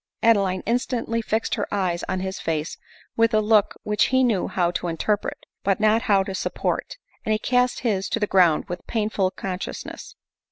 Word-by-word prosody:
Adeline 195 Hz, -5 st, +3 dB
instantly 235 Hz, 0 st, -1 dB
fixed 220 Hz, 0 st, -1 dB
her 210 Hz, -, -1 dB
fine 205 Hz, -, -1 dB
eyes 175 Hz, -2 st, -1 dB
on 185 Hz, -1 st, -1 dB
his 190 Hz, 0 st, -4 dB
face 160 Hz, 0 st, -2 dB, 0.4 s
with 230 Hz, 0 st, +3 dB
a -, -, +5 dB
look 215 Hz, -1 st, +3 dB
which 210 Hz, 0 st, +2 dB
he 260 Hz, 0 st, +3 dB
knew 220 Hz, -7 st, +1 dB
how 175 Hz, -2 st, 0 dB
to 175 Hz, -, -3 dB
interpret, 195 Hz, +5 st, -1 dB, 0.3 s
but 195 Hz, 0 st, +1 dB
not 215 Hz, +1 st, +3 dB
how 200 Hz, -5 st, +3 dB
to 195 Hz, -, -5 dB
sup 190 Hz, -, -3 dB
port; -, -, -2 dB, 0.3 s
and 220 Hz, -, +1 dB
he -, -, +2 dB
cast 250 Hz, +3 st, +1 dB
his 200 Hz, -6 st, 0 dB
to -, -, -1 dB
the 210 Hz, -, +2 dB
ground 180 Hz, -6 st, +3 dB
with 175 Hz, 0 st, -7 dB
painful 210 Hz, -4 st, 0 dB
con 185 Hz, -1 st, -5 dB
sciousness. -, -, -7 dB
205 Hz, 200 wpm, -24 LUFS, 185-225 Hz, 0.4 s, a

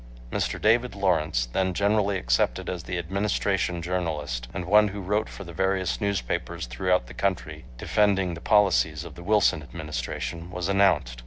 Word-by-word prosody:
Mr. -, -, -1 dB
David 115 Hz, +2 st, +2 dB
Lawrence, 80 Hz, -11 st, +1 dB
then 95 Hz, +9 st, -1 dB
generally 100 Hz, 0 st, +2 dB
accepted -, -, 0 dB
as 90 Hz, -2 st, -4 dB
the 90 Hz, -, -3 dB
Administration 95 Hz, -1 st, -1 dB
journalist, 75 Hz, -9 st, -2 dB
and 90 Hz, -, -5 dB
one 105 Hz, +3 st, +5 dB
who 100 Hz, 0 st, -6 dB
wrote 105 Hz, +3 st, -1 dB
for 100 Hz, -, -9 dB
the 85 Hz, -2 st, -10 dB
various 95 Hz, +2 st, 0 dB
newspapers 100 Hz, -15 st, -2 dB
throughout 75 Hz, +7 st, 0 dB
the -, -, -11 dB
country 95 Hz, -9 st, -2 dB
defending 95 Hz, -, +1 dB
the 85 Hz, -, -8 dB
policies 90 Hz, -7 st, +3 dB
of 85 Hz, -, -9 dB
the 85 Hz, -, -11 dB
Wilson 100 Hz, -4 st, +3 dB
Administration, 75 Hz, +3 st, -5 dB
was 90 Hz, -1 st, -3 dB
announced. 90 Hz, -12 st, +2 dB
90 Hz, 160 wpm, -26 LUFS, 80-100 Hz, -, one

